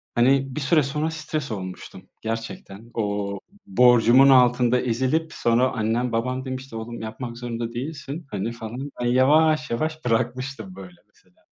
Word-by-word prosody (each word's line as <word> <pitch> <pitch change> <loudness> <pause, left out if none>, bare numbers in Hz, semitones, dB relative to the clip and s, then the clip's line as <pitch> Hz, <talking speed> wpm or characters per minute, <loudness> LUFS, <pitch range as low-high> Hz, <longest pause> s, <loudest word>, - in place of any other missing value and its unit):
hani, 135 +2 +3
bir 150 - -3
süre 155 +2 +3
sonra 150 +4 -2
stres 155 -3 -4
olmuştum 95 -3 -7
gerçekten. 115 -1 -6
O 100 -2 -2 0.3
borcumun 125 - +6
altında 125 -1 +4
ezilip 130 +7 0
sonra 120 +2 +2
annem 115 +2 -1
babam 125 +3 -2
demişti: 130 -1 -6
"Oğlum 115 +1 -6
yapmak 115 +2 -6
zorunda 120 -1 -4
değilsin." 145 +4 -6
hani, 105 +2 -2
falan. 120 +5 -7
Ben - - -1
yavaş 150 +5 +4
yavaş 155 +5 -2
bırakmıştım 120 -3 -2
böyle 90 -2 -11
mesela. 90 -1 -31
125 Hz, 140 wpm, -24 LUFS, 115-135 Hz, 0.3 s, borcumun